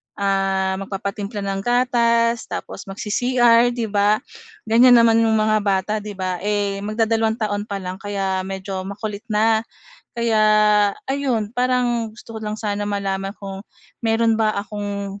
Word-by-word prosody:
ah, 195 -1 0
magpapatimpla 200 +1 -5
ng 195 0 -2
gatas, 235 -1 +2
tapos 195 - -7
mag-C-CR 240 +4 +3
'di 235 -2 -1
ba, 205 +1 +3 0.5
ganyan 245 +3 +6
naman 230 -1 +5
yung 225 -1 +3
mga 215 0 +2
bata, 200 +1 0
'di 205 -1 -7
ba? 185 -2 -2
Eh, 205 -1 -1
magdadalawang 220 +1 0
taon 205 -2 -2
pa 200 -2 -3
lang 185 +1 -6
kaya 195 -2 -2
medyo 190 0 -5
makulit 205 0 -6
na. 220 +1 +3 0.6
Kaya 230 -2 +1 0.7
ayun 240 -6 -1
parang 245 -2 0
gusto 230 0 -13
ko - - -3
lang 210 0 -3
sana 205 -1 -2
malaman 195 -1 -2
kung 195 -1 -7 0.4
meron 225 0 +2
ba 220 -1 +2
akong, 200 -1 -5
210 Hz, 140 wpm, -21 LUFS, 200-230 Hz, 0.7 s, ganyan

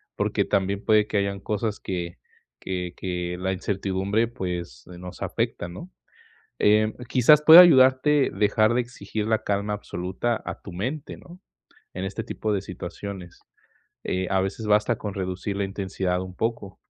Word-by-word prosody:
Porque, - - 0
también 100 0 -1
puede 105 -1 +4
que 105 - -1
hayan 100 0 -1
cosas 105 +1 -3
que 85 -4 -5 0.4
que 90 -2 -4
que 90 -1 -4
la 95 +1 -1
incertidumbre, 100 +3 -1
pues, 90 - -6
nos 90 0 -10
afecta, 85 - -2
¿no? 135 - -10 0.7
Em, 110 +1 +3
quizás, 135 +4 +5
puede 160 +3 +11
ayudarte, 135 -2 +5
dejar 110 +2 +2
de 125 - +2
exigir 110 -3 -5
la 110 -1 +1
calma 100 +1 -1
absoluta 95 +4 -3
a - - -6
tu 95 - -9
mente, 130 - -4
¿no? 175 +1 -15 0.5
En 95 +1 -4
este 95 - -4
tipo 110 - -3
de 100 - 0
situaciones. 95 -1 -8 0.6
Eh, 95 0 -2
a 95 - +2
veces, 95 +4 -3
basta 105 +2 +2
con 105 -2 -5
reducir 95 +1 -4
la 100 - -1
intensidad 95 -2 -2
un 90 -1 -9
poco. 115 -4 -3
100 Hz, 155 wpm, -25 LUFS, 95-110 Hz, 0.7 s, puede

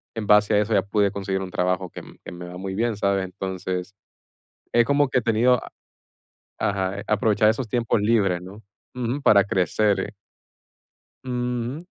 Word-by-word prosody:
en 110 -2 -3
base 105 0 +5
a - - +4
eso 105 +1 0
ya 95 - +4
pude 100 0 +1
conseguir 95 -1 -3
un 95 -1 -6
trabajo 90 0 -1
que - - -9 0.2
que - - -7
me 90 0 -8
va 90 0 -8
muy 95 0 -5
bien, 115 0 0
¿sabes? 100 -1 +1
Entonces, 95 0 -5 0.8
es 120 0 +5
como 145 +2 +3
que 125 - +2
he - - -6
tenido 115 +2 +3 1.0
ajá, 100 0 -1
aprovechar 105 0 +3
esos 115 +2 0
tiempos 115 -2 0
libres, 100 -5 +2
¿no? 100 +4 -11 0.3
Ujú, 125 +3 -3
para 100 -6 +6
crecer. 100 +3 0 1.1
Ujú, 125 +4 -3
105 Hz, 160 wpm, -23 LUFS, 95-115 Hz, 1.1 s, para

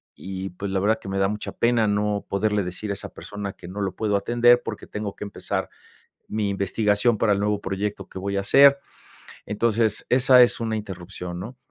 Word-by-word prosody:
y 95 0 -6
pues 100 +2 -5
la 95 - +1
verdad 110 +3 +2
que 95 - -8
me 95 - -2
da 95 0 +3
mucha 105 +1 -4
pena 115 -2 +2
no 105 0 0
poderle 105 +1 +1
decir 90 +4 -5
a - - 0
esa 100 - -6
persona 100 -1 -7
que 85 - -12
no 100 +3 -6
lo 95 -2 -2
puedo 105 -2 0
atender 120 +3 +4
porque - - -6
tengo 105 -1 -5
que - - -7
empezar 100 - -3 0.6
mi 105 -2 -1
investigación 105 +3 +1
para 105 -2 +3
el 100 - +1
nuevo 105 0 0
proyecto 100 +2 -3
que - - -7
voy 100 +1 -3
a - - +1
hacer. 140 +7 +6 0.7
Entonces, 110 0 0
esa 125 0 +6
es 120 - +3
una 110 -1 -1
interrupción, 90 -3 -7
¿no? 120 +6 -8
105 Hz, 205 wpm, -24 LUFS, 100-110 Hz, 0.7 s, hacer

